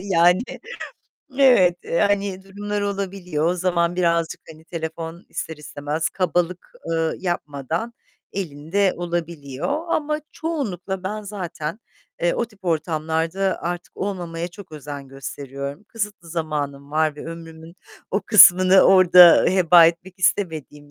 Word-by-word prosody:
Yani, 180 +1 +3 1.0
evet, 195 -10 +5 0.2
hani 200 -2 0
durumlar 205 +1 -4
olabiliyor. 190 -5 -2
O 175 - +2
zaman 175 -1 0
birazcık 170 -2 0
hani 160 +1 -18
telefon 165 0 -6
ister 160 - -5
istemez 150 +1 -3
kabalık, 180 -1 -2 0.2
ııı, 165 -1 0
yapmadan 170 - -3 0.4
elinde 180 +2 -1
olabiliyor. 170 - -3
Ama 305 -1 -1
çoğunlukla 200 - -4
ben 210 +2 -4
zaten, 190 -2 -6 0.4
eee, 175 - +2
o 235 - 0
tip 205 -4 -21
ortamlarda 165 +3 -1
artık 175 0 -5
olmamaya 175 -3 -4
çok 185 -2 -13
özen 145 -2 -8
gösteriyorum. 140 +4 -7
Kısıtlı 205 -6 -5
zamanım 145 -4 -4
var 155 -1 +1
ve - - -8
ömrümün 165 +1 -10 0.3
o 200 - 0
kısmını 185 -3 +7
orada 180 -2 +7
heba 175 -2 +6
etmek 170 +2 -2
istemediğim 155 -6 -1
175 Hz, 120 wpm, -22 LUFS, 160-195 Hz, 1.0 s, kısmını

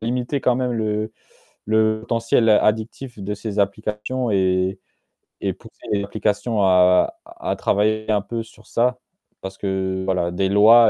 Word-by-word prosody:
limiter 125 +4 -2
quand 125 -1 +2
même 125 -1 -1
le 110 -1 -2 0.5
le 110 0 +2
potentiel 115 0 +1
addictif 110 +4 +1
de 100 +1 -3
ces 105 0 -5
applications 105 +5 -1
et 95 -1 +1 0.6
et - - -1
pousser - - -17
les 100 -1 +1
applications 105 +1 -1
à 90 - +4
à 345 +1 -4
travailler 110 +2 +1
un 105 -1 +2
peu 115 +3 -4
sur 110 -1 -19
ça, 125 +1 +1 0.4
parce 95 0 -7
que 95 -1 -2
voilà, 90 -2 0
des 95 +2 0
lois, 110 +3 +7
105 Hz, 150 wpm, -22 LUFS, 100-115 Hz, 0.6 s, lois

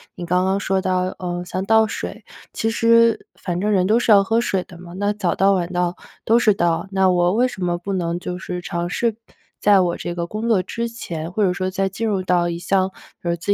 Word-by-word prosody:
你 175 - -6
刚 180 +1 +1
刚 190 +1 +1
说 195 -1 0
到， 185 -1 0 0.2
呃， 175 -1 -3
像 185 +1 -3
倒 220 +1 +5
水。 - - -6 0.3
其 225 - -1
实 230 0 +3
反 175 -1 -3
正 210 +1 +1
人 190 -3 +3
都 220 +3 +4
是 240 - +2
要 200 -1 +7
喝 225 +3 +1
水 195 -6 -1
的 175 - -14
嘛， 175 -1 -11
那 205 +1 0
早 190 -4 -1
倒 195 +1 +4
晚 180 -2 -1
倒 175 0 0 0.3
都 230 - +4
是 215 -3 +4
倒， 170 -1 0
那 190 -1 +3
我 175 0 +2
为 245 +4 +3
什 190 -7 -6
么 175 -1 0
不 195 +3 -5
能 175 -2 -1
就 180 0 -5
是 180 -1 -5
尝 175 -1 -3
试 230 +3 0 0.4
在 205 -1 +5
我 175 -2 +1
这 175 - -5
个 170 0 -3
工 215 +5 -4
作 210 -5 +4
之 235 +5 -4
前， 170 -8 -6
或 210 - -2
者 185 -2 +2
说 185 +1 -2
在 195 +1 -1
进 195 +4 -4
入 200 -3 0
到 175 -1 +1
一 170 0 -4
项， 190 +1 +1 0.3
呃， 170 -1 -1
自 170 - -13
185 Hz, 260 characters per minute, -21 LUFS, 175-210 Hz, 0.4 s, 要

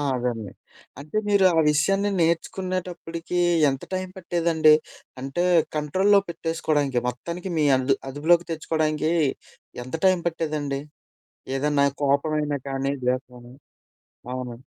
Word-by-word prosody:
అదండి. 120 -5 -3 0.5
అంటే, 155 +9 -5
మీరు 200 -2 +4
ఆ - - +6
విషయాన్ని 195 +7 +2
నేర్చుకునేటప్పటికి 175 0 -2 0.3
ఎంత 135 -1 -4
టైం 185 0 -2
పట్టేదండి? 165 -3 +3 0.5
అంటే, 135 +6 -2 0.3
కంట్రోల్లో 190 +7 +3
పెట్టేసుకోడానికి 155 -6 -1
మొత్తానికి 170 +9 -5
మీ 150 - +3
అందు 130 +1 +1
అదుపులోకి 165 +5 +2
తెచ్చుకోడానికి, 155 0 0 0.7
ఎంత 130 +6 -6
టైం 185 -2 +3
పట్టేదండి? 150 -4 -2 0.8
ఏదన్నా 145 0 +2 0.2
కోపం 140 +3 +1
అయిన 150 -1 -1
కానీ, 135 +1 -1
ద్వేసం 125 0 -1
అయిన. 120 +1 -14 0.8
అవునా? 125 -1 -6
155 Hz, 110 wpm, -24 LUFS, 135-170 Hz, 0.8 s, ఆ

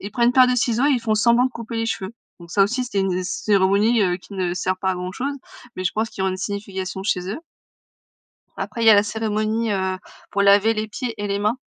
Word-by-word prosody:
ils 200 - -7
prennent 240 -1 +3
une - - +2
paire 255 -1 +7
de 250 - +2
ciseaux 245 +2 +1
et - - +3
ils 250 - +1
font 220 -1 0
semblant 235 +4 +4
de - - -4
couper 230 -1 -7
les 225 0 -1
cheveux. 195 -1 -3 0.3
Donc 170 - -13
ça 195 +2 +4
aussi, 240 +5 -1
c'était 205 -5 -2
une 190 -2 0
heu, 185 - -1
c 190 - -4
cérémonie 205 +3 +3
heu, 180 -2 +1
qui 200 - -16
ne 180 -2 -1
sert 185 +1 -1
pas 190 0 0
à - - -1
grand-chose, 185 +11 -4 0.4
mais 185 - -4
je 175 - 0
pense 220 +1 -2
qui 190 - -5
ont 190 - +2
une 185 - -2
signification 190 -1 -4
chez 180 -3 -1
eux. 230 - -4 1.2
Après 230 - -4
il - - +2
y - - +10
a - - +8
la 205 - +5
cérémonie, 215 +1 -1
heu, 190 -1 -1 0.3
pour 200 0 +1
laver 200 +3 +5
les 215 0 -2
pieds 235 +2 -5
et 205 0 -4
les 200 0 -1
mains. 210 +4 0
205 Hz, 265 wpm, -22 LUFS, 190-230 Hz, 1.2 s, y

